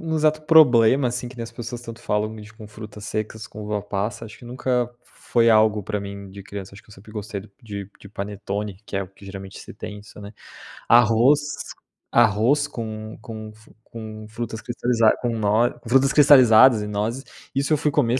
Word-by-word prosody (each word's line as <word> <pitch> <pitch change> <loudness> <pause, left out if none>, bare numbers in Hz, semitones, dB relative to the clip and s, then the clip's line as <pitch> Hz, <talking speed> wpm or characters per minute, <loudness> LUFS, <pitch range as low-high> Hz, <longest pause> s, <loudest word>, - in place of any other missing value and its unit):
um 160 -1 -3
exato 155 0 +2
problema 135 -5 +5
assim 120 0 -4
que 125 - -13
nem 115 - -5
as 115 - -11
pessoas 120 0 -6
tanto 115 -1 -9
falam 105 +1 -1
de 105 0 -11
com 110 -1 -12
frutas 105 0 -10
secas, 110 +1 -4
com 105 - -10
uva-passa, 105 +1 -3
acho 105 - -11
que - - -14
nunca 125 0 -1
foi 115 -1 0
algo 110 -1 +4
pra 105 +2 -3
mim 100 0 -8
de 100 +1 -10
criança. 100 0 -8
Acho 100 - -13
que - - -23
eu - - -13
sempre 105 +3 -15
gostei 105 -2 -5 0.2
de 100 -3 -7
de 100 - -12
panetone, 100 0 -5
que - - -4
é 100 - 0
o 95 - -9
que 100 +1 -18
geralmente 95 0 -9
se - - -11
tem 105 0 -7
é - - -9
isso 105 0 -14
né. 100 0 -9 0.6
Arroz 120 +4 +5 0.7
arroz 120 +6 +3
com 110 -5 -7
com 110 -1 -8
f 110 +1 -20
com 110 -2 -9
frutas 115 0 -5
cristalizadas 120 -2 +2
com 120 - 0
no 110 +1 +1
com 115 - -11
frutas 135 +2 +4
cristalizadas 130 -5 +7
e 105 - -5
nozes, 110 +5 -2 0.3
isso 140 +3 +1
eu - - +4
fui 150 +1 +1
comer 130 -3 +2
110 Hz, 205 wpm, -23 LUFS, 105-120 Hz, 0.7 s, cristalizadas